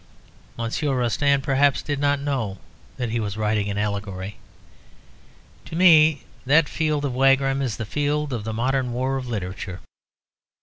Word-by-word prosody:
_ - - -27
Monsieur 125 +5 -1
Rostand, 140 +3 +1
perhaps, 140 0 +2
did 145 -2 -2
not 145 0 +2
know 130 -9 -2 0.4
that 125 -3 -3
he 120 - 0
was 105 -2 -3
writing 105 -1 0
an 100 - -3
allegory. 100 -1 -3 1.3
To - - -8
me 160 -5 +6 0.2
that 150 +3 +4
field 155 -2 -1
of 135 - -2
Wagram 135 +1 +3
is 125 -5 -2
the 110 - -4
field 145 +3 -1
of 115 -4 -3
the 110 - -4
modern 125 +2 -1
war 130 +2 -1
of 130 -1 -5
literature. 95 -3 -5
130 Hz, 160 wpm, -23 LUFS, 110-145 Hz, 1.3 s, me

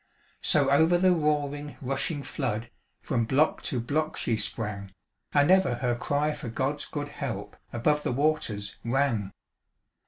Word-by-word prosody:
So 140 -2 +4
over 160 +5 +5
the 185 +1 +4
roaring 150 -2 -1
rushing 140 +3 -2
flood, 115 -2 -3 0.3
From 115 - 0
block 140 +7 +2
to 130 - -1
block 155 +6 -1
she 115 - 0
sprang, 105 -3 -3 0.4
And 145 +3 +4
ever 190 -9 +4
her 120 0 0
cry 145 +5 0
for 120 - -6
God's 135 +5 -2
good 145 -1 -5
help - - -5 0.2
Above 150 +6 +1
the - - -1
waters 125 -8 0
rang. 120 -5 0
140 Hz, 145 wpm, -28 LUFS, 120-150 Hz, 0.4 s, over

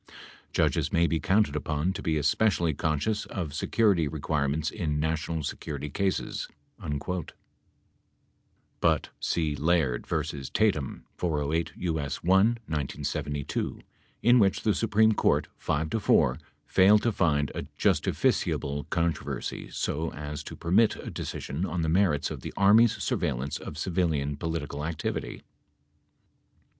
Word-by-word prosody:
Judges - - +1
may 85 - +3
be 85 -1 +1
counted 95 -6 +2
upon 75 +4 -1
to - - -6
be 80 -1 0
especially 85 +1 +2
conscious 80 +9 -1
of 85 -7 -4
security 95 0 +2
requirements 75 0 -1
in 75 -7 -2
national 80 +1 -1
security 75 0 -5
cases." 95 +4 -1 0.4
[Emphasis 75 -1 -4
added.] 90 -2 -5 1.5
(But - - +2
see, 80 -3 0
Laird 75 -5 +1
v. 70 - -2
Tatum, 100 -11 0
408 80 -1 -1
U.S. 80 -6 -2
1 85 - -2
(1972), 80 - -1 0.4
in 120 +2 +6
which 100 -3 +2
the 105 - +3
Supreme 110 0 +3
Court, 105 - +2
5 80 +2 -1
to 115 - 0
4, 65 -9 +3 0.3
failed 105 +3 +5
to 115 - +2
find 75 -8 +1
a - - -5
justificiable 70 +1 +1
controversy 85 -2 -2
so 80 +2 -2
as 75 0 -5
to - - -7
permit 100 +7 +3
a - - -7
decision 70 +7 -4
on 85 -2 -1
the 80 - 0
merits 85 -4 +2
of - - -6
the - - -7
Army's 110 +4 +6
surveillance 70 -9 -1
of - - -8
civilian 80 -6 0
political 75 -2 -4
activity.) 80 0 -4
80 Hz, 130 wpm, -28 LUFS, 75-95 Hz, 1.5 s, in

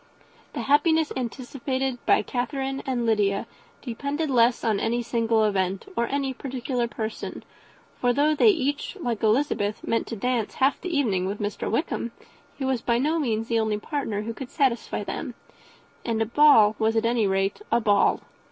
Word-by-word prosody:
The - - -3
happiness 315 +2 +3
anticipated 260 +1 -3
by - - +4
Catherine 270 +2 -3
and 245 -3 0
Lydia 205 -3 +1 0.4
depended 280 +5 -3
less 240 -1 +3
on 215 -3 +1
any 235 +2 0
single 230 -1 +1
event, 195 -2 0
or 235 - +1
any 275 0 -1
particular 255 -2 -3
person; 220 -1 -5 0.6
for 245 - +2
though 290 +4 +3
they 305 - +4
each, 290 0 -1
like 240 - -2
Elizabeth, 220 -2 +1
meant 230 - 0
to 230 - -4
dance 235 0 -1
half 270 +1 +2
the 365 - -4
evening 220 - +1
with 200 +2 -4
Mr. 205 -1 -3
Wickham, 235 -2 -2 0.4
he 270 - -3
was 260 -3 0
by 235 -1 +1
no 305 +6 +1
means 225 -6 -1
the 230 -1 +1
only 220 -1 0
partner 215 -3 -3
who 230 +1 -4
could 250 +2 -8
satisfy 265 -6 0
them, - - -5 0.7
and 230 -2 -1
a 225 - +2
ball 225 -4 +6
was, 220 0 +2
at 225 - +2
any 230 -3 +2
rate, 195 - 0
a 235 - +4
ball. 205 -3 +3
235 Hz, 170 wpm, -25 LUFS, 220-270 Hz, 0.7 s, ball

